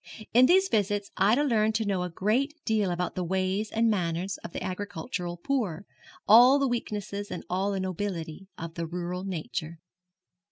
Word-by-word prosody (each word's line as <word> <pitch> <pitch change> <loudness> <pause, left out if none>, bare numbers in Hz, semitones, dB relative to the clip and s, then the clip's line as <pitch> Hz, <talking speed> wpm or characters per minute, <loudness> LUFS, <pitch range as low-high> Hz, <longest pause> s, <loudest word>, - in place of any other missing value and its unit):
In 250 +2 +7
these 380 +2 +5
visits 205 - 0
Ida 220 +9 +4
learned 220 -5 +2
to 220 +1 0
know 195 -3 0
a 180 - -2
great 230 - 0
deal 215 -4 +1
about 175 0 -2
the 185 - -2
ways 190 +4 -1
and 230 +1 +1
manners 185 -2 -1
of - - -7
the - - -5
agricultural 185 -1 -4
poor, 200 - -2 0.4
all 245 +6 +8
the 275 -1 +1
weakness 220 -4 -3 0.2
and 180 - -5
all 190 +3 0
the 195 - -2
nobility 185 -2 -4
of 165 0 -6
the 165 -1 -4
rural 180 +2 -4
nature. 170 -3 -4
195 Hz, 170 wpm, -28 LUFS, 180-220 Hz, 0.4 s, all